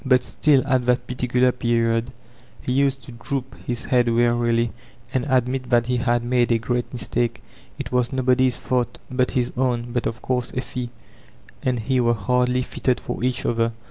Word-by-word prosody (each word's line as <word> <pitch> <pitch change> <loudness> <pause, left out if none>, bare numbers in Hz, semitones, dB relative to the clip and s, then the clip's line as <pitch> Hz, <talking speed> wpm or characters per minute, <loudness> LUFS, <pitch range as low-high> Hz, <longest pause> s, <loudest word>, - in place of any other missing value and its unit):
But 130 -2 +4
still, 140 0 +3
at 130 -3 +1
that 125 0 +2
particular 125 0 +1
period, 115 -1 0 0.5
he - - -4
used 135 0 +1
to 125 - -11
droop 130 +2 -4
his 120 -1 -3
head 125 -3 +3
wearily 120 0 +2 0.4
and 130 +2 0
admit 130 0 +1
that 120 -2 +3
he 125 0 0
had 120 0 +1
made 120 0 +2
a 115 - +4
great 120 +2 -2
mistake. 120 -1 -2 0.3
It - - -6
was 125 -1 +1
nobody's 130 -1 +2
f - - -16
auk 125 -1 +1
but 125 0 +1
his 125 -1 +1
own, 120 -2 0
but 120 -1 0
of 115 - -5
course— 125 -2 -1
Effie 125 -1 -3 0.7
and 125 -1 0
he 130 +4 +1
were 120 -1 +3
hardly 125 +4 +1
fitted 125 0 -1
for - - -5
each 125 -1 0
other. 115 0 +1
125 Hz, 180 wpm, -23 LUFS, 120-130 Hz, 0.7 s, But